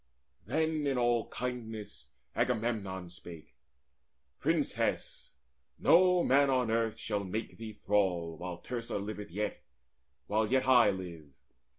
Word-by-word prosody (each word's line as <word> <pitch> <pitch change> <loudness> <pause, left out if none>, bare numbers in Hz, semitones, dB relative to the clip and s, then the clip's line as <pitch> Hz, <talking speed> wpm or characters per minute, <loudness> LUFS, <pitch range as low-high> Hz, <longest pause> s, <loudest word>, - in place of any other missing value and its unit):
Then 155 +2 0
in 135 -2 +1
all 120 -2 +2
kindness 115 -4 -5 0.3
Agamemnon 105 -7 -1
spake: 85 -2 -12 0.9
"Princess, - - -1 0.4
no 180 0 +5
man 140 +1 +4
on 125 -4 +2
earth 115 -1 +1
shall 105 -3 -2
make 105 +5 -4
thee 110 -1 -6
thrall, 95 -6 0
While 90 +1 -6
Teucer 115 +4 -4
liveth 105 +1 -5
yet, 105 +4 -3 0.6
while 110 +1 +1
yet 130 0 +2
I 125 -5 +7
live. 85 -6 -5
110 Hz, 115 wpm, -32 LUFS, 95-125 Hz, 0.9 s, I